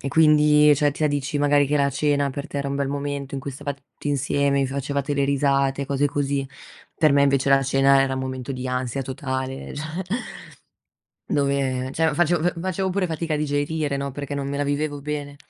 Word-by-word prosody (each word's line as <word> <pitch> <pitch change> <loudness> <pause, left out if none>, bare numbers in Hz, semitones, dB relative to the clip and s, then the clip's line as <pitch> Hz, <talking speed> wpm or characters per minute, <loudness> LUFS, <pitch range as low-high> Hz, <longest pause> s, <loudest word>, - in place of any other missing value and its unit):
e 140 - -3
quindi, 150 0 +5
cioè, 145 +1 +2
tu 145 - -6
mi 150 - +2
dici 145 +1 -2
magari 145 0 +3
che 150 +2 +1
la 140 -1 +2
cena 140 0 +1
per 140 +3 -6
te 145 - -7
era 140 - -2
un 140 - -2
bel 140 -1 -1
momento 140 -1 -4
in 135 - -3
cui 140 - -5
stavate 140 0 -6
tutti 145 - -7
insieme, 140 0 +1
vi 135 - +1
facevate 140 +1 -2
le 140 - +1
risate, 140 0 +1
cose 140 +1 +1
così. 140 -1 -1 0.5
Per 155 -3 +4
me 140 - +4
invece 140 -1 +2
la 135 0 +5
cena 135 0 +4
era 135 -1 +1
un 130 - -3
momento 130 0 -4
di 130 0 -5
ansia 125 +1 -2
totale, 130 0 -4
cioè 155 +2 -6 1.4
dove, 135 -2 0
cioè, 160 -1 +1
facevo 175 +1 +2
fa 175 - +2
facevo 190 +1 -1
pure 185 0 0
fatica 160 -1 -3
a - - -1
digerire, 145 0 -1
no, 140 0 -3
perché 145 +1 -5
non 140 -1 -3
me 140 - -3
la 145 - 0
vivevo 145 0 -2
bene. 145 -1 -4
140 Hz, 215 wpm, -23 LUFS, 135-145 Hz, 1.4 s, quindi